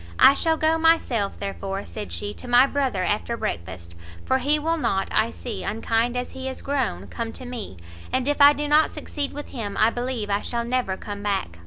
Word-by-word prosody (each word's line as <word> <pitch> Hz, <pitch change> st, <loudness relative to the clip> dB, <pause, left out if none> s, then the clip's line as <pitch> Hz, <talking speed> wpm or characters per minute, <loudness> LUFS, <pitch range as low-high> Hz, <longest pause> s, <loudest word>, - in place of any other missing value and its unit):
"I 275 Hz, -, +8 dB
shall 320 Hz, +2 st, +1 dB
go 315 Hz, +1 st, +2 dB
myself, 300 Hz, -11 st, +2 dB
therefore," 195 Hz, 0 st, -4 dB
said 210 Hz, -1 st, -7 dB
she, 205 Hz, 0 st, -3 dB
"to 250 Hz, -, -10 dB
my 245 Hz, +2 st, +6 dB
brother 270 Hz, -9 st, 0 dB
after 215 Hz, +4 st, -1 dB
breakfast, 85 Hz, -, -5 dB, 0.3 s
for 260 Hz, -, +2 dB
he 290 Hz, +4 st, +3 dB
will 325 Hz, +2 st, 0 dB
not, 195 Hz, -10 st, 0 dB
I -, -, +2 dB
see, 85 Hz, +3 st, -6 dB
unkind 230 Hz, +2 st, 0 dB
as 250 Hz, -, -3 dB
he 265 Hz, 0 st, -5 dB
is 260 Hz, -, -7 dB
grown, 275 Hz, -3 st, -1 dB
come 230 Hz, -1 st, -5 dB
to 255 Hz, -, -8 dB
me; 235 Hz, -, -6 dB, 0.3 s
and 260 Hz, 0 st, 0 dB
if 290 Hz, 0 st, +1 dB
I 285 Hz, +1 st, +9 dB
do 295 Hz, +1 st, -3 dB
not 300 Hz, +1 st, +5 dB
succeed 285 Hz, -2 st, -4 dB
with 290 Hz, 0 st, -7 dB
him, 210 Hz, -6 st, -5 dB
I 220 Hz, +2 st, +5 dB
believe 240 Hz, -4 st, -3 dB
I 200 Hz, +1 st, +1 dB
shall 235 Hz, -1 st, -2 dB
never 240 Hz, -6 st, -1 dB
come 205 Hz, 0 st, -7 dB
back!" 195 Hz, -, -2 dB
240 Hz, 210 wpm, -24 LUFS, 205-280 Hz, 0.3 s, I